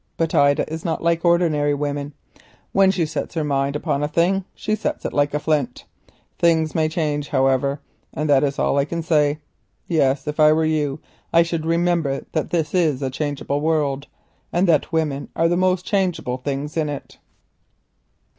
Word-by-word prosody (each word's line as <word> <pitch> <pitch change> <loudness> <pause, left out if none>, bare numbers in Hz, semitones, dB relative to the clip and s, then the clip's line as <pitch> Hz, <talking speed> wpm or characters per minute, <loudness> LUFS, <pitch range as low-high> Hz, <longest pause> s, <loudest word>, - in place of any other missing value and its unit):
But 165 -1 -1
Ida 140 +1 +3
is 160 +1 -6
not 165 -1 -2
like 170 0 +1
ordinary 160 -4 +2
women. 145 0 -3 0.6
When 195 -1 +4
she 185 -4 +1
sets 155 +1 -5
her 160 - 0
mind 140 -1 0
upon 140 -1 -1
a 150 - 0
thing 180 +5 +1
she 215 - -2
sets 300 +7 -2
it - - -3
like 145 0 +1
a - - +1
flint. 145 -5 -1 0.5
Times 160 -2 +2
may 155 -1 +1
change, 150 -3 -2
however, 135 +2 +1 0.3
and 155 - -3
that 140 -2 +4
is 140 -1 -1
all 140 - +1
I 140 - +2
can 170 +2 -4
say. 150 -3 +2 0.5
Yes, 140 -4 +1
if 150 +1 -4
I 155 0 +7
were 160 0 +1
you, 150 -2 0 0.3
I 170 0 +5
should 165 -1 -3
remember 165 -4 0
that 155 - -2
this 165 -3 -1
is 155 -7 +1
a 130 - -1
changeable 145 0 -2
world, 145 -3 0 0.4
and 180 +2 +2 0.2
women 155 -4 -1
are 165 - +3
the 175 - +1
most 185 0 +1
changeable 180 -10 -1
things 140 +3 -4
in 155 -2 0
it." 145 -2 -7
155 Hz, 180 wpm, -21 LUFS, 145-170 Hz, 0.6 s, I